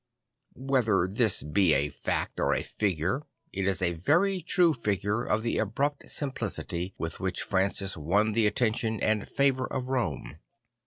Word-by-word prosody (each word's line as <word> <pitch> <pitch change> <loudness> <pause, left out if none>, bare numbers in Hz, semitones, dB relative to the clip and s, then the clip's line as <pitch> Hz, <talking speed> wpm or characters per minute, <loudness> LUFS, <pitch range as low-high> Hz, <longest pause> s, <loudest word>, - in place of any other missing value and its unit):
Whether 125 -8 +1
this 105 +1 +1
be 80 +2 +3
a 70 +2 +1
fact - - -3
or - - +2
a - - -1
figure 95 - -1 0.3
it 95 0 -1
is 95 -1 0
a 85 - +2
very 175 - +2
true 175 -3 +4
figure 105 -2 -1
of 110 -2 0
the 115 - 0
abrupt 140 +7 -1
simplicity 100 - -3
with 80 0 -4
which 95 -1 -2
Francis 95 0 0
won 100 +8 +1
the 110 0 +3
attention 110 0 0
and 110 -1 +1
the - - -9
favour 135 -2 +1
of 130 -1 -4
Rome. 120 - -2
105 Hz, 160 wpm, -28 LUFS, 95-130 Hz, 0.3 s, true